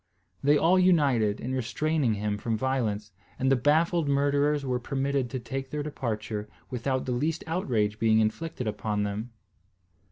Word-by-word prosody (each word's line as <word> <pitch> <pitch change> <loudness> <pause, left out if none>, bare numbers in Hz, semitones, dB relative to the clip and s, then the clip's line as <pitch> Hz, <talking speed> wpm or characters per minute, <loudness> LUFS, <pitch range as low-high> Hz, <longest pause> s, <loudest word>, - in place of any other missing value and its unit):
They 145 +2 +5
all 175 +5 +4
united 140 - +3
in 130 +2 -4
restraining 130 0 0
him 105 0 -2
from 115 +1 -1
violence; 110 -5 -1 0.3
and 130 +1 +1
the - - +6
baffled 155 +4 +2
murderers 145 +1 +2
were 125 -1 0
permitted 135 0 -1
to 130 - -3
take 135 +2 -5
their 150 +1 -3
departure 110 -7 -4 0.2
without 130 +1 -1
the 130 - -2
least 150 +7 -1
outrage 115 - 0
being 110 -1 +4
inflicted 125 +6 -1
upon 105 -1 -1
them. 105 +3 -3
130 Hz, 155 wpm, -28 LUFS, 110-145 Hz, 0.3 s, the